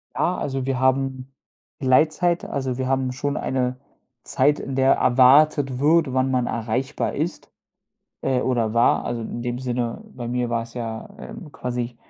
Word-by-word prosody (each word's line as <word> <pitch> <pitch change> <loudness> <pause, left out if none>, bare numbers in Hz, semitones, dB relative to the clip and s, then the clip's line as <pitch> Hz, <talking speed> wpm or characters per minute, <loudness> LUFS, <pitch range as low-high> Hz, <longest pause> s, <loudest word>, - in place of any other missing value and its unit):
Ja, 180 - 0
also 135 -2 -3
wir 130 -2 -1
haben, 130 0 0 0.5
Gleitzeit. 155 +6 +2
Also, 130 -3 -3
wir 130 -1 -2
haben 130 -1 0
schon 140 +3 -3
eine 125 -1 -1 0.5
Zeit, 145 +3 +2
in 135 - -5
der 135 0 +4
erwartet 135 +1 +4
wird, 155 -2 +3
wann 130 0 +1
man 125 -2 +1
erreichbar 120 +4 -2
ist, - - -4 0.7
äh, 130 -2 0
oder 120 -4 0
war, 115 - +3
also 120 -1 -3
in 120 - -5
dem 120 0 -3
Sinne, 120 -2 -3
bei 120 -2 -6
mir 125 0 -1
war 115 -1 0
es 115 +1 -12
ja, 115 - -5
ähm, 215 -7 -9
quasi 120 -2 -4
130 Hz, 165 wpm, -23 LUFS, 120-135 Hz, 0.7 s, der